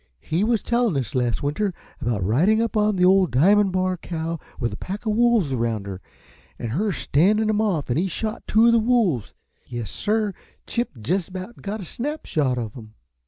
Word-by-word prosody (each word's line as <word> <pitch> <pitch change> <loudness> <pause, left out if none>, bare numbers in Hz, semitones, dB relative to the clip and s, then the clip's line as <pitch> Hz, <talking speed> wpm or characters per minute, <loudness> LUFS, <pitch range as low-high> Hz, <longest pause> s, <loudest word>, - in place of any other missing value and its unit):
"He 165 - -1
was 225 -1 +1
tellin' 235 - +1
us 130 -5 -3
last 125 -1 0
winter 175 +7 -1 0.3
about 115 -5 -1
ridin' 165 - +3
up 230 -1 -1
on 210 -1 +2
that 180 -1 +3
ole 190 0 +5
Diamon' 195 +10 +4
Bar 185 0 0
cow 165 -1 -4 0.2
with 120 -4 -1
a - - -3
pack 195 - -6
uh 215 - +1
wolves 225 - +3
around 115 -4 -1
her, 95 -1 -6 0.6
an' 115 - -4
her 180 - 0
a - - +1
standin' 210 +11 +2
'em 215 0 +1
off, 185 -9 0
an' 120 - +1
he 180 +4 +1
shot 215 +5 -3
two 220 +2 +4
uh - - +5
the 235 - +5
wolves. 220 - +1 0.3
Yes, 120 -5 -5
sir; 215 -1 0 0.3
Chip 235 - -3
jest 180 - 0
about 185 +5 -8
got 210 +1 -4
a - - -7
snap 295 - -4
shot 135 -6 0
of 110 -3 -4
'em." 110 -4 -11
185 Hz, 210 wpm, -23 LUFS, 130-215 Hz, 0.6 s, ole